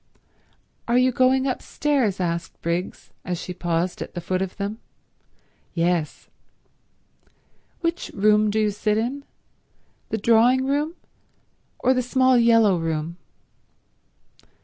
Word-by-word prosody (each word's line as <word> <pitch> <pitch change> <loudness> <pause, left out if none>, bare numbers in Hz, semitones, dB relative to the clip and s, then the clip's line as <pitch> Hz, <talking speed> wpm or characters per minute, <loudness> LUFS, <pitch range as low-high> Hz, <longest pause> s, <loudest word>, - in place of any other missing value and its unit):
"Are 235 +1 +2
you 255 +1 +4
going 260 +1 +3
upstairs?" 265 -5 -1
asked 170 -2 -3
Briggs, 170 +2 -3
as 180 -2 -3
she 180 - -6
paused 175 0 -2
at - - -7
the - - -2
foot 185 +2 -2
of 190 -1 -4
them. 205 +3 -4 1.0
"Yes." 170 -2 -1 1.5
"Which 340 +1 -2
room 210 +1 +3
do 215 +1 0
you 210 -1 +2
sit 210 +1 0
in? 260 +6 -3 0.8
The 220 - -1
drawing 235 +4 +4
room, 295 +4 -1 0.8
or 260 - +2
the 255 - +1
small 255 +1 +3
yellow 230 -5 +4
room?" 165 +1 -3
215 Hz, 120 wpm, -23 LUFS, 180-255 Hz, 1.5 s, you